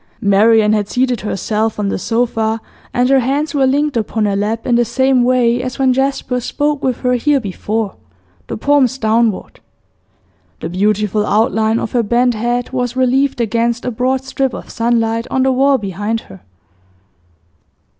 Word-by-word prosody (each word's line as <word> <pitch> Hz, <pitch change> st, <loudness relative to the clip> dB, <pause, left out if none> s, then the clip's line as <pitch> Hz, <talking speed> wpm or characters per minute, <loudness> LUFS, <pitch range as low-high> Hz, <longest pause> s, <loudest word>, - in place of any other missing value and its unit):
Marian 215 Hz, +1 st, +4 dB
had 210 Hz, -1 st, -1 dB
seated 250 Hz, -3 st, 0 dB
herself 215 Hz, +2 st, -2 dB
on 205 Hz, -1 st, -1 dB
the -, -, -2 dB
sofa, 225 Hz, 0 st, -1 dB, 0.3 s
and 245 Hz, 0 st, +1 dB
her 270 Hz, 0 st, +4 dB
hands 280 Hz, +4 st, -1 dB
were 275 Hz, -2 st, +2 dB
linked 285 Hz, +2 st, 0 dB
upon 220 Hz, -1 st, -1 dB
her 200 Hz, -1 st, 0 dB
lap 215 Hz, +3 st, -2 dB
in 245 Hz, -, +1 dB
the 240 Hz, 0 st, +4 dB
same 260 Hz, +1 st, +2 dB
way 245 Hz, -1 st, +2 dB
as 255 Hz, 0 st, -5 dB
when 265 Hz, -1 st, +3 dB
Jasper 265 Hz, -1 st, -1 dB
spoke 290 Hz, +3 st, -2 dB
with 255 Hz, -2 st, -1 dB
her 250 Hz, -1 st, +1 dB
here 275 Hz, +4 st, +2 dB
before, 210 Hz, 0 st, -3 dB, 0.5 s
the -, -, -5 dB
palms 270 Hz, 0 st, +2 dB
downward. 220 Hz, -3 st, 0 dB, 1.0 s
The -, -, -5 dB
beautiful 210 Hz, +3 st, 0 dB
outline 220 Hz, +1 st, +1 dB
of 230 Hz, -, -3 dB
her 245 Hz, -, +2 dB
bent 240 Hz, +3 st, +2 dB
head 240 Hz, +2 st, -2 dB
was 250 Hz, -1 st, -2 dB
relieved 260 Hz, +1 st, +1 dB
against 235 Hz, +1 st, 0 dB
a 250 Hz, -, -1 dB
broad 255 Hz, +3 st, -1 dB
strip 265 Hz, -1 st, -2 dB
of -, -, -9 dB
sunlight 230 Hz, 0 st, 0 dB
on 260 Hz, -, +1 dB
the 265 Hz, -, +2 dB
wall 270 Hz, +2 st, +3 dB
behind 210 Hz, +2 st, -3 dB
her. 95 Hz, -2 st, -14 dB
235 Hz, 165 wpm, -16 LUFS, 220-260 Hz, 1.0 s, Marian